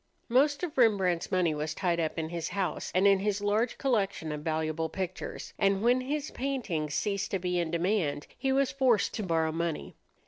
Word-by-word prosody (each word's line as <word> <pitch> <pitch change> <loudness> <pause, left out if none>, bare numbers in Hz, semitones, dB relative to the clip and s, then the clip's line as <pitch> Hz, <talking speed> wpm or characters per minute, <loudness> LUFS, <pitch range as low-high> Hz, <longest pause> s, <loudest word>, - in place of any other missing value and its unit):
Most 280 +6 +3
of 310 -6 -3
Rembrandt's 190 -7 +3
money 180 -4 +2
was 150 +1 -3
tied 175 -3 0
up 160 0 -1
in 160 -1 -2
his 170 -1 -3
house 195 -2 -2
and 185 +2 +4
in 200 -1 +6
his 205 0 0
large 210 +4 0
collection 200 - 0
of 150 0 -4
valuable 160 0 -1
pictures; 185 -1 -5
and 195 0 +2
when 245 +2 +4
his 290 +3 -3
paintings 210 - -2
ceased 200 -2 -1
to 195 - 0
be 180 -1 -1
in 170 -2 -1
demand, 170 -3 0
he 270 - -1
was 270 0 +2
forced 260 -5 +2
to - - -3
borrow 165 -4 +1
money. 165 -1 -3
190 Hz, 195 wpm, -29 LUFS, 165-235 Hz, -, in